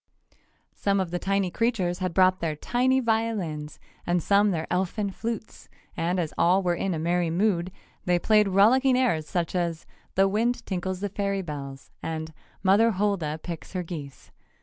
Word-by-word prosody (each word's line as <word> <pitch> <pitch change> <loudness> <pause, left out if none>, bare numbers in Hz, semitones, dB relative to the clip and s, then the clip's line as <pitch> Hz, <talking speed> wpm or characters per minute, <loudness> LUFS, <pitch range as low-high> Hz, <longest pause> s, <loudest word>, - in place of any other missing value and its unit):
Some 200 -1 0
of 185 -3 -2
the 175 - -2
tiny 195 -1 0
creatures 200 -6 0
had 185 -2 -1
brought 185 0 +4
their 160 -2 -2
tiny 255 - +1
violins 220 -11 -1 0.3
and 175 -1 0
some 205 +1 +4
their 165 -4 -1
elfin 190 +3 -1
flutes, 225 +2 -6 0.3
and 175 +2 0
as 165 -3 -2
all 185 +3 +4
were 175 -1 +2
in 185 +1 -1
a - - -3
merry 170 +1 0
mood 180 0 +1 0.3
they 180 -1 +3
played 210 +3 +4
rollicking 250 +7 +4
airs 170 -12 +1
such 175 -3 -1
as 170 -3 -2 0.3
"The 195 +1 +4
Wind 230 +5 0
Tinkles 185 0 -3
the 205 - -1
Fairy 200 -1 -2
Bells" 140 -4 -7
and 160 0 -4 0.3
"Mother 205 +4 +5
Hulda 180 -6 -1
Picks 170 0 -7
Her 180 -1 -2
Geese." 150 -6 -8
185 Hz, 170 wpm, -26 LUFS, 170-205 Hz, 0.3 s, Mother